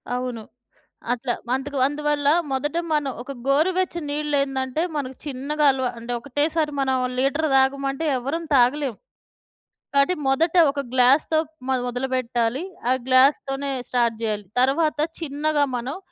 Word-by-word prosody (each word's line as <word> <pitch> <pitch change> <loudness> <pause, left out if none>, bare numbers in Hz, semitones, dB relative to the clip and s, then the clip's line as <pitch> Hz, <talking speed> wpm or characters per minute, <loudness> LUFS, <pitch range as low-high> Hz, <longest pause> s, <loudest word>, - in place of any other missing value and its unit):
అవును. 250 -3 -4 0.7
అట్లా. 245 0 -1
అందుకు 270 +2 -2
అందువల్ల 290 0 0 0.2
మొదట 295 +5 -1 0.2
మనం 290 -3 +1
ఒక 275 - -7
గోరు 300 +6 +3
వెచ్చని 345 -3 -1
నీళ్ళేందంటే, 280 -1 -1
మనకి 265 -2 -4
చిన్నగా 290 +3 -2
అలవా 260 -1 -1
అంటే, 235 +1 -5
ఒకటేసారి 295 +4 0
మనం 265 -1 +1 0.2
లీటర్ 280 +4 +1
తాగమంటే 275 +2 +1
ఎవ్వరం 290 +7 -3
తాగలేం. 260 +1 +3 1.0
కాబట్టి 280 +6 +3
మొదట 320 +6 +2 0.2
ఒక 280 - -5
గ్లాస్‌తో 260 +5 +4 0.3
మొద 265 - +2
మొదలుపెట్టాలి. 250 +1 -1 0.3
ఆ - - +4 0.2
గ్లాస్‌ 260 +2 +6
తోనే 275 +1 -3 0.2
స్టార్ట్ 235 -2 +1
జేయాలి. 210 -2 -2
తరవాత 295 +4 +2 0.2
చిన్నగా 295 -1 0
మనం 250 +7 -4
275 Hz, 125 wpm, -23 LUFS, 255-295 Hz, 1.0 s, గ్లాస్‌